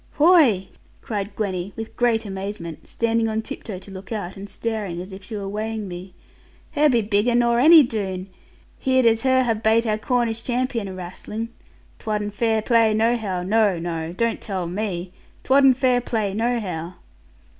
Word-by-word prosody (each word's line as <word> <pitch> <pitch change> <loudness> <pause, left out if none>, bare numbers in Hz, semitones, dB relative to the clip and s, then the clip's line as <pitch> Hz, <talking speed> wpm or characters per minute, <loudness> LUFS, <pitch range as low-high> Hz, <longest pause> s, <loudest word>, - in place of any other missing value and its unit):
'Whoy!' 290 - +5 0.3
cried 200 -2 -4
Gwenny, 195 -2 -3
with 225 0 -7
great 230 -2 +1
amazement, 190 -4 -6
standing 230 -1 +1
on 220 0 -2
tiptoe 210 -3 -7
to 195 +2 -12
look 190 +2 -10
out, 200 -4 -4
and 200 +1 -9
staring 210 -7 -3
as 185 +2 -8
if 190 0 -10
she 220 +3 -7
were 200 -1 -4
weighing 215 +1 -3
me: 180 +1 -9 0.6
'her 300 0 +3
be 235 -4 +2
bigger 210 +3 +1
nor 235 0 +3
any 315 +3 +8
Doone! 195 -6 -3 0.5
Heared 260 -1 +2
as 225 -1 +4
her 260 0 +3
have 225 -3 -1
bate 225 +1 +3
our 215 -1 0
Cornish 235 -1 0
champion 245 -3 -1
awrastling. 190 +5 -6 0.5
'Twadn't 210 -2 -2
fair 220 0 +1
play 225 -3 +3
nohow: 220 -5 0
no, 205 -1 +2
no; 165 -1 -4
don't 230 +6 -1
tell 190 -4 -3
me, 180 -1 -4 0.3
'twadn't 270 -1 +5
fair 255 -2 +3
play 215 -5 -2
nohow.' 200 -7 -2
220 Hz, 165 wpm, -23 LUFS, 190-235 Hz, 0.6 s, any